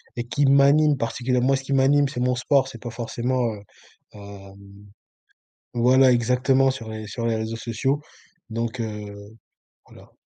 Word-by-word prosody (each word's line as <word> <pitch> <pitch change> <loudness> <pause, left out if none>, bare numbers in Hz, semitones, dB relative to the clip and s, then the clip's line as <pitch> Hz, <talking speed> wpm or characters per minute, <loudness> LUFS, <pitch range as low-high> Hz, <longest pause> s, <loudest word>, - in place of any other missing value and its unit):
et 120 - -3
qui 140 +4 0
m'anime 140 +2 +4
particulièrement. 125 +2 -1
Moi, 135 - +4
ce - - -6
qui 140 - -3
m'anime, 140 +1 +3
c'est 125 - -6
mon 125 0 +1
sport, 135 +1 +1
c'est 135 - -11
pas 120 - -6
forcément, 120 +2 -2
heu, 100 - -10 0.5
hem 100 -1 -12 1.2
voilà 130 +2 +4
exactement 130 +3 +2
sur 115 -4 -8
les 110 -1 -7
sur 115 +2 -5
les 115 -1 0
réseaux 110 +1 -4
sociaux. 130 +6 -2 0.5
Donc 115 +2 -4
heu, 105 -2 -5 0.8
voilà. - - -17
125 Hz, 160 wpm, -23 LUFS, 115-135 Hz, 1.2 s, m'anime